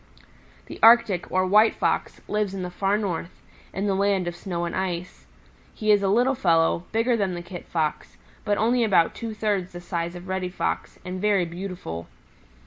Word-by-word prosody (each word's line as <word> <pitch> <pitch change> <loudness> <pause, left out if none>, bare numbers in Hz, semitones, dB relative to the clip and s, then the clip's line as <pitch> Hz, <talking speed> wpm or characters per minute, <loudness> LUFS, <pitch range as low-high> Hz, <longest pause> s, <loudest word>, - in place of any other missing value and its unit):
"The - - -10
Arctic, 225 -6 +5
or 185 0 +2
White 210 +4 +5
Fox, - - -1
lives 210 -2 -1
in 190 - -4
the 180 - -5
Far 195 +3 +1
North, 180 -5 -4 0.3
in 195 +2 -3
the 200 - +1
land 195 -2 +1
of 175 - -3
snow 175 -2 -4
and 170 - -4
ice. 180 -1 -4 0.5
He 215 -1 +1
is 205 -1 +5
a 195 - +1
little 245 +7 +3
fellow, 170 -5 +2
bigger 230 +2 +2
than 195 -5 -1
the 175 - -6
Kit 175 0 -9
Fox, 155 -3 -2 0.3
but 205 -1 0
only 235 +2 +2
about 190 -6 +3
two 225 -2 -6
thirds 205 -4 -1
the 175 - -7
size 170 -1 -4
of 175 +1 -9
Reddy 185 -1 -2
Fox, 180 - -3
and 185 0 -5
very 200 -3 +2
beautiful. 170 - -6
190 Hz, 190 wpm, -25 LUFS, 175-210 Hz, 0.5 s, Arctic